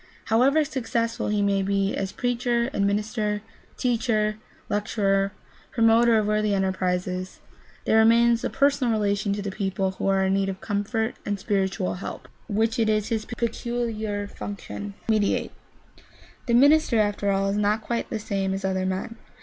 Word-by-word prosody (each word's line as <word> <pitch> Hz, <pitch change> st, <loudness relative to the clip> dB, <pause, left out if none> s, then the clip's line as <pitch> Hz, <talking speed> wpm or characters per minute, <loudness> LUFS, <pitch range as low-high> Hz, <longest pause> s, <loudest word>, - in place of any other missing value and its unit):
However 275 Hz, +7 st, +4 dB
successful 230 Hz, -4 st, -2 dB
he 210 Hz, -1 st, +1 dB
may 200 Hz, -1 st, +2 dB
be 195 Hz, 0 st, 0 dB
as 195 Hz, 0 st, -3 dB
preacher, 245 Hz, +1 st, 0 dB
administrator, 210 Hz, 0 st, -1 dB, 0.3 s
teacher, 220 Hz, -3 st, 0 dB, 0.3 s
lecturer, 200 Hz, -1 st, 0 dB, 0.4 s
promoter 230 Hz, 0 st, +4 dB
of 215 Hz, -, +1 dB
worthy 210 Hz, -1 st, +1 dB
enterprises, 185 Hz, -1 st, -2 dB, 0.5 s
there 220 Hz, -, +4 dB
remains 230 Hz, +1 st, +5 dB
the -, -, -1 dB
personal 280 Hz, -3 st, +2 dB
relation 205 Hz, -1 st, 0 dB
to 205 Hz, 0 st, -4 dB
the 200 Hz, -, -3 dB
people 190 Hz, -1 st, -1 dB
who 190 Hz, -, -4 dB
are 195 Hz, -1 st, +3 dB
in 190 Hz, -, +1 dB
need 195 Hz, 0 st, +1 dB
of 190 Hz, -1 st, -5 dB
comfort 215 Hz, +2 st, -2 dB
and 205 Hz, -1 st, -2 dB
spiritual 190 Hz, -2 st, -1 dB
help, 180 Hz, -, -7 dB, 0.2 s
which 225 Hz, +2 st, 0 dB
it 220 Hz, -1 st, +2 dB
is 215 Hz, -1 st, +1 dB
his 220 Hz, -2 st, -1 dB
peculiar 230 Hz, -3 st, -3 dB
function 205 Hz, 0 st, -7 dB
to -, -, +1 dB
mediate. 210 Hz, -2 st, +1 dB, 1.0 s
The 235 Hz, -, +3 dB
minister, 285 Hz, -1 st, +5 dB
after 205 Hz, -1 st, +1 dB
all, 195 Hz, 0 st, +1 dB
is 200 Hz, -, -1 dB
not 210 Hz, +1 st, +1 dB
quite 235 Hz, +1 st, -2 dB
the 225 Hz, -, -2 dB
same 195 Hz, -3 st, -2 dB
as 195 Hz, -, -4 dB
other 190 Hz, -1 st, 0 dB
men. 190 Hz, +5 st, -3 dB
210 Hz, 155 wpm, -25 LUFS, 195-230 Hz, 1.0 s, remains